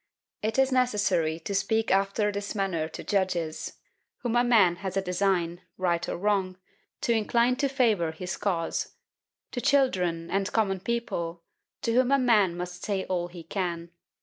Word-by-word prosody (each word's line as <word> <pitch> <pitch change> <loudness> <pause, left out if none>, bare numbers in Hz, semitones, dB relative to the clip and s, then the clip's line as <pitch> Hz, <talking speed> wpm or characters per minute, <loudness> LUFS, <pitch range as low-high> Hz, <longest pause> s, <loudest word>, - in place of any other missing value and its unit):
It 220 +3 -1
is 265 0 +4
necessary 200 -10 +1
to 200 - -4
speak 220 +3 +1
after 200 +2 +2
this 200 +1 -4
manner 180 -6 -1
to - - -8
judges, 180 -5 -1 0.5
whom 240 -1 -1
a 240 - +5
man 205 -8 +4
has 190 0 -4
a - - +3
design, 180 -2 0 0.2
right 175 -2 0
or - - -2
wrong, 190 -1 0 0.4
to 235 - +2
incline 235 +3 +2
to 275 0 +1
favour 220 - +2
his 180 +3 -5
cause; 175 -5 -2 0.6
to 245 - -3
children 180 -13 +1
and 195 +1 0
common 195 -4 +1
people, 175 -7 -3 0.4
to 230 - +1
whom 255 +2 +3
a 275 - +6
man 210 -9 +3
must 180 0 -6
say 195 -2 -1
all 175 -2 -1
he 175 -1 -10
can. 170 -1 -3
195 Hz, 165 wpm, -27 LUFS, 175-225 Hz, 0.6 s, a